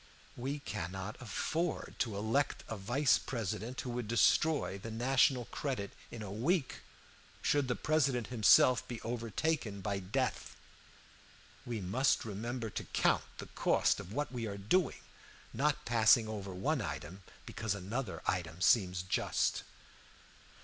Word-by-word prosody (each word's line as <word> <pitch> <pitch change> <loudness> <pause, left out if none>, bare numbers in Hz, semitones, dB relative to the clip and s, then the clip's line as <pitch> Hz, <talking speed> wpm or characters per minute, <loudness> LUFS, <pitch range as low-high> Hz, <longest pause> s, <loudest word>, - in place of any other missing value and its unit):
We 135 +4 -3
cannot 95 - -5
afford 160 - -2
to 110 -4 -1
elect 115 +7 0
a 110 - -4
vice 120 +8 +2
president 115 +1 -4
who 125 - -5
would 120 -2 -3
destroy 120 -1 +3
the 115 - -7
national 125 +2 +2
credit 125 -9 -3 0.2
in 115 -2 -7
a 100 - -6
week, 135 - 0 0.6
should 145 -2 +2
the 125 - 0
President 140 -6 +1
himself 120 +2 +5
be 120 -2 -5
overtaken 115 0 -2
by 100 0 -2
death. 95 0 -2 1.1
We 115 -3 -3
must 115 +10 +1
remember 115 +2 -4
to - - -4
count - - +2
the - - -6
cost - - +2
of 90 - -8
what 145 +3 -2
we 120 -3 -3
are 100 -1 -5
doing, 135 - +1 0.5
not 150 +1 0
passing 115 0 +5
over 100 -3 -5
one 130 +10 0
item 85 +1 -5 0.2
because 110 -2 -2
another 110 +8 -4
item 85 -2 -2
seems 90 -3 +3
just. 95 - 0
115 Hz, 135 wpm, -33 LUFS, 100-130 Hz, 1.1 s, himself